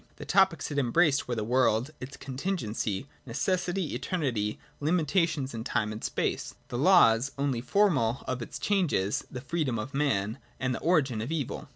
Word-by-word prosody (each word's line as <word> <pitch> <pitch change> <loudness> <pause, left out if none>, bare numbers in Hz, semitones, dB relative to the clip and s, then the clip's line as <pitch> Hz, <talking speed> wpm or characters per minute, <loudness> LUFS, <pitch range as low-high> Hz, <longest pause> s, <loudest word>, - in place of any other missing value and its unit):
The - - -9
topics 190 -6 +3
it 145 - 0
embraced 140 +3 +3
were 120 - -1
the 110 - -2
world, 125 +2 +2
its 130 +2 -8
contingency, 130 - -3 0.2
necessity, 175 +6 -1
eternity, 125 - -1 0.2
limitation 155 -2 +1
in 115 -1 -4
time 110 -2 -1
and 110 - -7
space: - - -2
the 120 - -3
laws 140 -7 +5
(only 140 -4 0
formal) 130 - +2
of 130 -1 -2
its 120 - -6
changes: 170 - +1
the 125 - -6
freedom 140 -3 -1
of 125 +6 -5
man 115 -7 0 0.2
and 130 0 0
the - - -3
origin 140 -10 +2
of 120 +7 -4
evil. 155 -5 -3
135 Hz, 165 wpm, -29 LUFS, 115-165 Hz, 0.2 s, laws